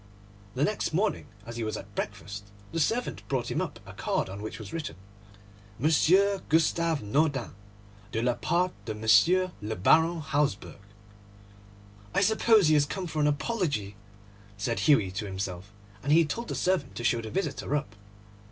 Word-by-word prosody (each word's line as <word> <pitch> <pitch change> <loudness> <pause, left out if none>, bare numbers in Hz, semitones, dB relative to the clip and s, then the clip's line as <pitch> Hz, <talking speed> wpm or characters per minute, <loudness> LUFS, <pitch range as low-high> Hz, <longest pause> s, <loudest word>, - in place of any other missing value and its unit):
The 135 - +1
next 210 -2 -1
morning, 195 -1 0 0.2
as 115 +1 -7
he 115 - -2
was 110 -1 -2
at 100 +1 -11
breakfast, 100 -1 -5 0.3
the 165 - -2
servant 230 +10 0
brought 130 -4 -1
him - - 0
up - - -5
a - - -10
card - - -1
on 100 +2 -7
which 110 - -6
was 110 -3 -9
written, 165 -2 -4 0.8
'Monsieur 185 - +3
Gustave 165 -1 +2
Naudin, 140 +3 0 0.6
de 110 +2 -1
la 125 0 +2
part 175 +9 0
de 110 - -3
M. 110 - +4
le 110 +1 -3
Baron 160 - +4
Hausberg.' 145 -9 -1 1.3
'I - - +4
suppose 220 -2 +4
he 155 - +4
has 145 -1 +4
come 190 +3 -4
for 155 -2 -4
an 150 - +3
apology,' 145 - -1 0.6
said 115 +3 -1
Hughie 115 -11 +4
to 100 +2 -4
himself; 95 0 -5 0.3
and 145 - -1
he 165 +2 +6
told 235 +10 -4
the - - -3
servant 180 -7 0
to 120 - -5
show 120 0 +2
the 110 - -7
visitor 170 - -2
up. 140 -9 -3
145 Hz, 170 wpm, -28 LUFS, 110-170 Hz, 1.3 s, he